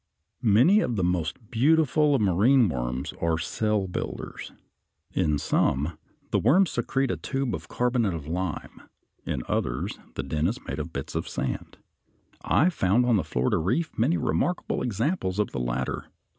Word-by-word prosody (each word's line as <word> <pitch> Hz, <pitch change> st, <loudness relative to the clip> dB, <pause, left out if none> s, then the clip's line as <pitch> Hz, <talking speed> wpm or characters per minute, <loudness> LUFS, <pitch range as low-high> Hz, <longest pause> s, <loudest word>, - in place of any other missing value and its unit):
Many 125 Hz, -, +5 dB
of 120 Hz, -, 0 dB
the 95 Hz, -, 0 dB
most 90 Hz, +5 st, -2 dB
beautiful 150 Hz, +3 st, +3 dB
of 130 Hz, -, +1 dB
the -, -, +3 dB
marine 110 Hz, +7 st, +4 dB
worms 65 Hz, +1 st, -3 dB
are 85 Hz, -1 st, +1 dB
cell 105 Hz, +4 st, 0 dB
builders 90 Hz, -, -5 dB, 0.6 s
(Fig. 95 Hz, -, +1 dB
77). 75 Hz, -, +2 dB
In -, -, +2 dB
some 75 Hz, +2 st, 0 dB, 0.3 s
the -, -, +3 dB
worms 170 Hz, -, +4 dB
secrete 135 Hz, -1 st, 0 dB
a -, -, -2 dB
tube 135 Hz, -2 st, -2 dB
of -, -, -5 dB
carbonate 120 Hz, -6 st, 0 dB
of 80 Hz, -3 st, -6 dB
lime. 85 Hz, +1 st, -4 dB, 0.5 s
In -, -, -2 dB
others -, -, -2 dB, 0.2 s
the 65 Hz, -, -2 dB
den 75 Hz, +4 st, 0 dB
is 115 Hz, +6 st, -1 dB
made 70 Hz, -, -4 dB
of 80 Hz, +2 st, -5 dB
bits 70 Hz, -4 st, -5 dB
of -, -, -3 dB
sand. 65 Hz, -, -4 dB, 0.7 s
I 175 Hz, +5 st, +3 dB
found 115 Hz, -, +2 dB
on 120 Hz, -3 st, +4 dB
the 90 Hz, -, 0 dB
Florida 65 Hz, -4 st, 0 dB
Reef 125 Hz, -, 0 dB
many 135 Hz, +10 st, +2 dB
remarkable 180 Hz, 0 st, -1 dB
examples 115 Hz, -, -1 dB
of 105 Hz, -2 st, 0 dB
the 70 Hz, -, -3 dB
latter. -, -, -3 dB
100 Hz, 170 wpm, -26 LUFS, 80-130 Hz, 0.7 s, Many